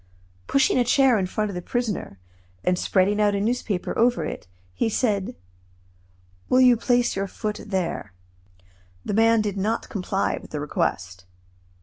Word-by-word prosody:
Pushing 270 -1 +3
a - - +4
chair 250 -1 +4
in 185 - -1
front 210 +2 -2
of - - -8
the 180 - -4
prisoner, 220 - -3 0.5
and 180 0 +1
spreading 200 +2 +2
a 210 -1 +4
newspaper 215 -3 -2
over 235 -8 +2
it, 150 - -6 0.3
he 225 - 0
said: 215 0 -1 1.1
"Will 255 - +4
you 250 -1 +7
place 245 +1 +1
your 195 0 -2
foot 210 +2 -5
there?" 185 - -3 0.9
The - - -2
man 225 +1 +4
did 205 -2 -3
not 215 +4 -1
comply 195 -1 -1
with - - -13
the 150 - -4
request. 90 - -3
210 Hz, 150 wpm, -24 LUFS, 185-235 Hz, 1.1 s, you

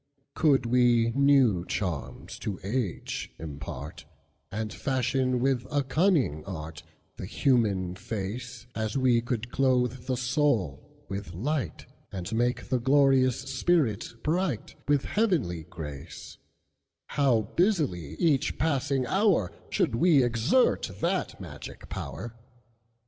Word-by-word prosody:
Could 145 -6 +3
we 120 -1 +4
new 135 -8 +4
charms 90 -6 -4
to 100 -3 -4
age 105 -3 -3
impart, 70 -3 -7 0.5
And 110 +1 -3
fashion 130 -1 0
with 130 -1 +1
a 145 -1 +1
cunning 135 - +2
artThe 80 -1 -9
human 105 -7 +1
face, 115 +4 -5
As 110 +2 -2
we 125 -3 +3
can 120 -1 -2
clothe 125 0 0
the 130 -1 0
soul 125 - -1
with 95 -3 -6
light, 140 - -2 0.3
And 95 +2 -5
make 120 +2 0
the 130 - +2
glorious 130 -1 +4
spirit 135 - 0
brightWith 150 - 0
heavenly 155 - 0
grace, 75 -5 -9 0.7
How 130 -6 +3
busily 145 - +1
each 145 - +1
passing 140 -3 +1
hourShould 185 - +1
we 145 +2 +5
exert 120 - +2
that 180 +3 -1
magic 75 -7 -9
power! 75 - -6
125 Hz, 105 wpm, -28 LUFS, 100-140 Hz, 0.7 s, we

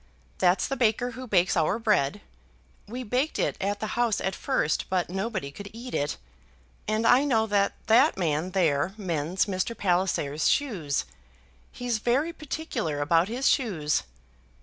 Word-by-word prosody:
That's 180 +2 +3
the 270 - -2
baker 245 0 +1
who 255 +2 -8
bakes 185 -4 +3
our 165 +4 +2
bread, 210 -12 +1 0.7
we 245 +4 -5
baked 250 +7 -1
it - - 0
at 205 +1 -1
the - - -3
house 235 -3 +1
at 190 - -1
first, 260 - -1
but 180 -2 0
nobody 190 -6 -3
could 200 +7 -9
eat 245 +2 -8
it; 145 - -1 0.7
and 215 +1 0
I 250 +4 +6
know 230 -6 +2
that 200 -2 +1
that 235 +6 +5
man 165 -1 0
there 175 -1 +1
mends 175 -3 -1
Mr. 200 +3 -2
Palliser's 175 -6 +1
shoes. 180 - 0 0.7
He's 245 -3 -2
very 270 +9 +1
particular 300 - -4
about 165 +4 +3
his 250 +5 -1
shoes. 170 - +1
205 Hz, 150 wpm, -27 LUFS, 175-240 Hz, 0.7 s, I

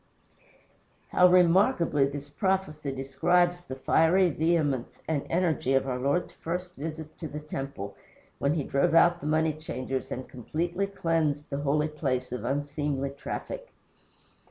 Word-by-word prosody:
How 180 - +6
remarkably 175 -4 +4
this 145 0 -6
prophecy 155 -2 -1
describes 175 +7 +1
the 155 -7 -7
fiery 165 +6 +3
vehemence 150 -5 0
and 155 -3 -1
energy 160 -6 +1
of 135 0 +2
our 125 -1 -2
Lord's 140 +7 0
first 180 +2 -5
visit 155 0 -7
to 160 - -4
the 150 0 -6
temple, 135 -9 -6 0.4
when 140 +3 +1
he 150 - 0
drove 140 +4 +1
out 175 +1 +5
the 150 - -4
money 155 +1 +2
changers 135 -4 -4
and 130 - -4
completely 170 - -2
cleansed 165 -6 -1
the 140 - -1
holy 150 +2 +1
place 135 -5 -2
of 125 -3 -4
unseemly 145 +1 -1
traffic! - - -6
150 Hz, 140 wpm, -28 LUFS, 140-170 Hz, 0.4 s, How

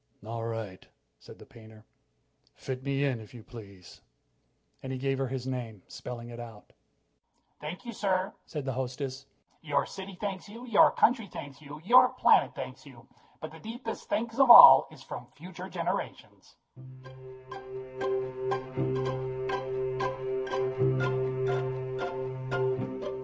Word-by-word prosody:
"All 115 +1 -4
right," 115 -5 -5 0.4
said - - -13
the - - -14
painter, 110 -4 -16 0.7
"fit 130 -1 -5
me 140 +1 0
in, 130 -4 0
if 110 +2 -13
you 115 - -10
please." 100 -7 -13 0.8
And 130 - -6
he 130 - -3
gave 135 +1 -1
her 135 - 0
his 130 -1 -4
name, 120 -7 -5
spelling 120 -1 -8
it 120 0 -9
out. 115 -3 -11 0.9
"Thank 160 +10 -7
you, 235 - -5
sir," 195 -1 0
said 150 -3 -5
the 135 - -2
hostess. 130 +1 -4 0.3
"Your 145 -3 0
city 190 -1 -8
thanks 195 -1 -4
you; 230 +4 -9
your 230 -5 +6
country 230 -3 +2
thanks 145 -5 -9
you; 150 +1 -10
your 245 +7 +7
planet - - +4
thanks - - -7
you. - - -15 0.3
But - - -6
the - - -12
deepest 225 +1 -7
thanks 230 +2 -2
of 270 -2 +6
all 235 - +12
is - - -14
from - - -8
future 180 -1 -9
generations." - - -5
135 Hz, 125 wpm, -29 LUFS, 120-190 Hz, 0.9 s, all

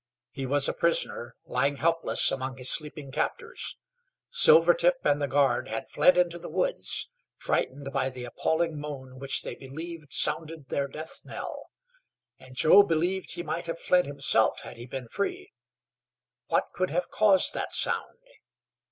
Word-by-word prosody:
He 135 -1 -5
was 140 +1 +4
a - - 0
prisoner, 165 -7 -1
lying 140 +3 0
helpless 165 +3 +2
among 130 0 -4
his 125 0 +4
sleeping 150 -3 0
captors. 470 - -3 0.5
Silvertip - - +5
and 145 +1 +2
the 145 - 0
guard 135 -1 +1
had 110 +1 -5
fled 180 +5 +4
into 175 -1 +1
the - - -9
woods, - - 0 0.3
frightened 135 +1 -2
by 135 -1 0
the 125 -1 -9
appalling 160 +5 -1
moan 130 -3 -8
which 135 0 -1
they - - -6
believed 155 +2 -9
sounded 160 -3 +1
their 140 0 -1
death 155 +3 -7
knell. - - -8 0.7
And 130 0 -15
Joe 160 +9 +7
believed 180 +1 -1
he 175 - -5
might 170 0 -4
have 165 - -4
fled 180 0 +2
himself 140 -1 +1
had - - -10
he 120 +1 -10
been 130 -1 -7
free. 370 - -4 0.9
What - - 0
could 185 - -1
have 175 +4 -2
caused 200 -4 +4
that - - -4
sound? - - 0
150 Hz, 155 wpm, -27 LUFS, 135-175 Hz, 0.9 s, Joe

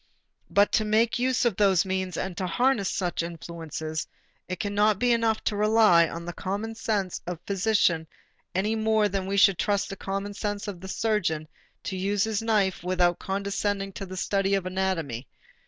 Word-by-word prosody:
But 200 +1 +4
to 215 - +3
make 220 +3 +2
use 255 0 +1
of 235 -5 +2
those 195 -4 +4
means 185 -2 -2
and 185 -1 -3
to 185 +1 -2
harness 240 +1 +2
such 180 -3 -1
influences, 165 -2 -5 0.4
it 185 -1 -4
cannot 205 0 +2
be 245 +3 +2
enough 230 -2 +1
to 210 - 0
rely 210 -5 +5
on 170 0 -6
the 175 - -5
common 205 +6 -3
sense 205 -5 -2
of 180 -1 -3
the 200 - -2
physician 185 -5 +2 0.5
any 210 +4 +1
more 220 -1 +2
than 195 -1 -3
we 200 +1 -1
should 195 -2 +5
trust 205 -1 0
the 195 - -5
common 195 +1 -4
sense 205 0 -3
of 190 -4 -6
the 190 - -7
surgeon 190 -8 0 0.4
to 190 - -4
use 195 +2 0
his 220 -1 -1
knife 210 -6 +1
without 180 -1 +2
condescending 200 0 -2
to 195 - -6
the 185 +1 -7
study 195 +1 +1
of 195 -2 -2
anatomy. 185 -10 -2
195 Hz, 185 wpm, -26 LUFS, 180-210 Hz, 0.5 s, rely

